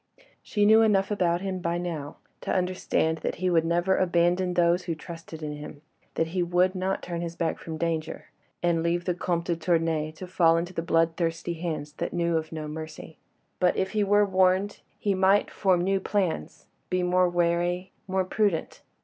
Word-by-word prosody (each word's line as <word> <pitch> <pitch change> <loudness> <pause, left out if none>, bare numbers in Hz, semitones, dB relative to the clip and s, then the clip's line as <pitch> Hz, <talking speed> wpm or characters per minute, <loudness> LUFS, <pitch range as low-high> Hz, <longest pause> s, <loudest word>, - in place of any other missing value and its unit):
She 205 -1 0
knew 220 +2 +7
enough 205 -2 +3
about 175 -4 +1
him 190 -1 -3
by 170 -1 -1
now 165 -5 -5 0.2
to - - -3
understand 180 -3 0
that - - -3
he 185 +2 0
would 165 -2 +4
never 175 +3 +2
abandon 175 0 +2
those 175 +1 +3
who 170 -2 -2
trusted 165 -1 -9
in 150 -1 -4
him, 150 0 -10 0.3
that 165 - 0
he 180 +2 -1
would 180 +2 +2
not 190 0 -2
turn 170 -1 -4 0.2
back 165 -2 -1
from 160 -1 -6
danger, 160 -1 -3 0.3
and 170 -1 +2
leave 170 +1 0
the 180 - +1
Comte 170 -1 -2
de 175 - 0
Tournay 165 -2 0
to 170 +4 -8
fall 170 -2 +3
into 175 +2 -3
the 165 - -2
bloodthirsty 165 +1 0
hands 160 -3 -4
that - - -3
knew 170 -1 +1
of 160 -1 -2
no 155 -1 -5
mercy. 155 0 -8 0.4
But 180 -1 +2
if 190 0 0
he 215 -1 +1
were 205 +1 +4
warned, 190 +1 +2 0.2
he 205 - 0
might 190 +2 +3
form 185 -3 +2
new 195 +1 +1
plans, 185 - -2 0.2
be 185 0 0
more 180 0 +3
wary, 175 +1 0 0.2
more 190 0 0
prudent. 200 -3 -1
175 Hz, 185 wpm, -27 LUFS, 165-185 Hz, 0.4 s, knew